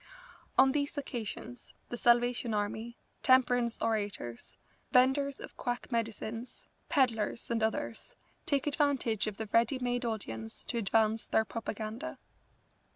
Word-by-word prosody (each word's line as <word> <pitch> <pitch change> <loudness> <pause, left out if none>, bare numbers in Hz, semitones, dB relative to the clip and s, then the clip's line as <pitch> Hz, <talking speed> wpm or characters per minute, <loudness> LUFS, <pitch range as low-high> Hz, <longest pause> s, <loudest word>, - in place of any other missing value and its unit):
On 265 0 +7
these 285 +1 -1
occasions 245 -2 -5
the - - -3
Salvation 240 -1 +3
Army, 220 +3 -2 0.2
temperance 245 -2 +4
orators, 205 - -2 0.3
venders 265 +2 +4
of - - -9
quack 245 +2 -3
medicines, 230 +1 -3 0.2
pedlars, 235 -7 +1
and 230 -1 +1
others, 220 0 -2 0.3
take 280 -2 +2
advantage 280 -8 +1
of 210 -2 -4
the 220 - -3
ready 235 +4 +4
made 245 0 -1
audience 115 - -4
to 235 - -2
advance 220 +1 +2
their 220 - +3
propaganda. 225 +5 -5
235 Hz, 120 wpm, -32 LUFS, 220-255 Hz, 0.3 s, On